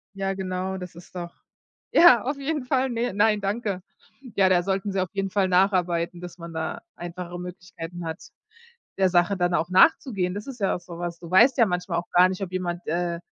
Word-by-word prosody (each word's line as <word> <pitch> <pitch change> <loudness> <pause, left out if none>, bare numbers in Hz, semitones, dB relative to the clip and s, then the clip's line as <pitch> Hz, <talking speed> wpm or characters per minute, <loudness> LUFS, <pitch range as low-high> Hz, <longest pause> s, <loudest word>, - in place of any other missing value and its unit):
Ja, 195 0 -2
genau, 190 0 -3
das 180 -2 -8
ist 175 - -14
doch 175 -1 -6 0.6
ja, 250 -11 +7
auf 280 +3 -2
jeden 285 -1 -2
Fall. 265 0 +1
Ne, 235 -2 -1
nein, 210 0 +3
danke. 200 -2 -2 0.5
Ja, 190 -1 +5
da 180 -1 +3
sollten 195 +1 -1
sie 195 - 0
auf 185 - -3
jeden 195 -1 -1
Fall 195 -2 +1
nacharbeiten, 180 -2 +1
dass 180 0 -9
man 170 0 -8
da 160 0 -4
einfachere 175 0 -7
Möglichkeiten 175 -1 -8
hat, 160 0 -5 0.8
der 190 -1 +3
Sache 175 +2 +2
dann 175 -1 +1
auch 170 +1 0
nachzugehen. 185 - +3
Das 210 +6 -6
ist 255 -4 -8
ja 195 - +1
auch - - -5
so 170 -1 -10
was, 175 -1 -4
du 170 -1 -10
weißt 240 +8 +6
ja 230 - +7
manchmal 180 -1 -1
auch 175 - -9
gar 180 +1 +6
nicht, 190 +1 -5
ob 185 - -6
jemand, 175 -1 -3
äh, 170 +1 -1
185 Hz, 210 wpm, -25 LUFS, 175-200 Hz, 0.8 s, ja